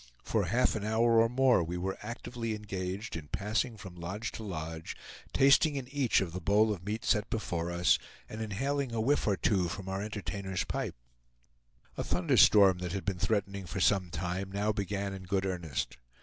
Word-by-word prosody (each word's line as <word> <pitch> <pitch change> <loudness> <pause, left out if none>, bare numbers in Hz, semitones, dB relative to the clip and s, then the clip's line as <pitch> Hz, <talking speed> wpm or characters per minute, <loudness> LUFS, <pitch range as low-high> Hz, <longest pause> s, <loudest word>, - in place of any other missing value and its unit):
For - - 0
half 125 +2 +2
an 105 - -3
hour 115 +1 +4
or 115 - +3
more 125 -5 +4
we 85 +2 -4
were 95 +2 -2
actively 115 0 -4
engaged 100 -1 -4
in 75 -2 -6
passing 110 - -1
from 95 -3 -9
lodge 95 +6 -5
to - - -7
lodge, 80 -4 -5 0.4
tasting 140 +3 +5
in 135 -3 -4
each 140 -7 +2
of 85 -4 -3
the 90 - -4
bowl 105 +5 +3
of 90 -3 -8
meat 105 +3 -4
set 105 -2 +2
before 85 -6 -2
us, 85 +1 +3 0.3
and 110 - -7
inhaling 130 +4 -1
a - - 0
whiff 135 +5 +2
or 100 -2 +2
two 90 +1 +2
from 95 +2 -6
our 95 +1 -2
entertainer's 100 -2 -3
pipe. - - -3 1.0
A - - -1
thunderstorm 95 -3 +5
that 90 -1 -4
had 100 - -3
been 95 -3 -1
threatening 100 -3 -1
for 95 - -4
some 95 -1 +3
time 90 +3 -3
now 105 +2 0
began 100 -1 -2
in 95 - -7
good 95 +1 0
earnest. 85 -8 -3
100 Hz, 190 wpm, -31 LUFS, 90-110 Hz, 1.0 s, tasting